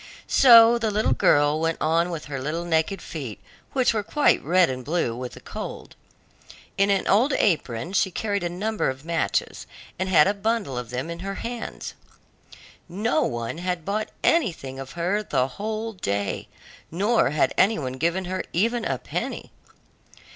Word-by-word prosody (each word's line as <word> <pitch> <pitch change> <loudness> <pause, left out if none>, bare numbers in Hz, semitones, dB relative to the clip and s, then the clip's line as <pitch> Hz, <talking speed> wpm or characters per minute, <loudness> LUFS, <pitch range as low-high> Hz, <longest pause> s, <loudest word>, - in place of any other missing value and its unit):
So 235 -2 +7
the 225 -2 0
little 210 - +1
girl 145 +4 +3
went 165 0 0
on 165 +2 +1
with 165 -3 -5
her 135 -3 -5
little 160 +5 -3
naked 165 +3 0
feet, 135 -10 -6 0.3
which 255 -3 +2
were 215 - 0
quite 290 +8 +2
red 180 +3 +4
and 130 -1 -4
blue 150 -5 -1
with 125 0 -6
the - - -11
cold. - - -8 0.8
In 195 +1 +2
an 195 -1 +1
old 245 +8 +3
apron 160 - 0
she 190 - +2
carried 200 +1 -2
a 175 - -2
number 210 +3 -1
of 130 +3 -7
matches, 170 0 -1 0.3
and 185 0 -1
had 170 -5 +6
a 200 - +2
bundle 210 - -1
of 125 -2 -5
them 130 +7 -4
in 170 - -7
her 195 +2 -5
hands. 240 0 -6 1.0
No 220 - 0
one 120 - -3
had 180 -2 -3
bought 215 +2 -2
anything 165 - +1
of 135 0 -8
her 180 +5 0
the 130 -10 0
whole 215 - -4
day, 100 - -3 0.4
nor 205 - +2
had 150 +2 +1
any 215 +4 +3
one 130 -4 -4
given 170 +7 -1
here 185 +1 -3
even 230 +6 +1
a - - -1
penny. - - -5
175 Hz, 170 wpm, -24 LUFS, 145-215 Hz, 1.0 s, So